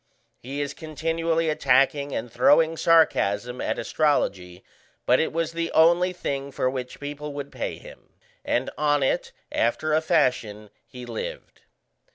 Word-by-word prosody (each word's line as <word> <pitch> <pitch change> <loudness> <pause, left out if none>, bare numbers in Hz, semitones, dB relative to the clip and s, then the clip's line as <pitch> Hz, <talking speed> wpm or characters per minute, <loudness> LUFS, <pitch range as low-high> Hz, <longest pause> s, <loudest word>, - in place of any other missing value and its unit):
He 140 +4 -5
is 145 - -3
continually 165 +1 -1
attacking 140 -1 +2
and 120 -2 -4
throwing 155 +6 +4
sarcasm 125 -9 +2
at - - -2
astrology, 95 - -1 0.4
but 125 - +4
it 160 - 0
was 165 0 -1
the 165 0 -3
only 170 +3 +4
thing 140 -6 -4
for 130 - -1
which 125 -1 -6
people 145 0 -6
would 140 0 -6
pay - - -4
him, - - -15 0.3
and 125 +2 -1
on 145 -2 +2
it 130 - 0 0.2
after 155 +7 0
a 155 - +3
fashion 125 - 0 0.2
he 125 -1 -10
lived. - - -7
145 Hz, 145 wpm, -25 LUFS, 125-160 Hz, 0.4 s, throwing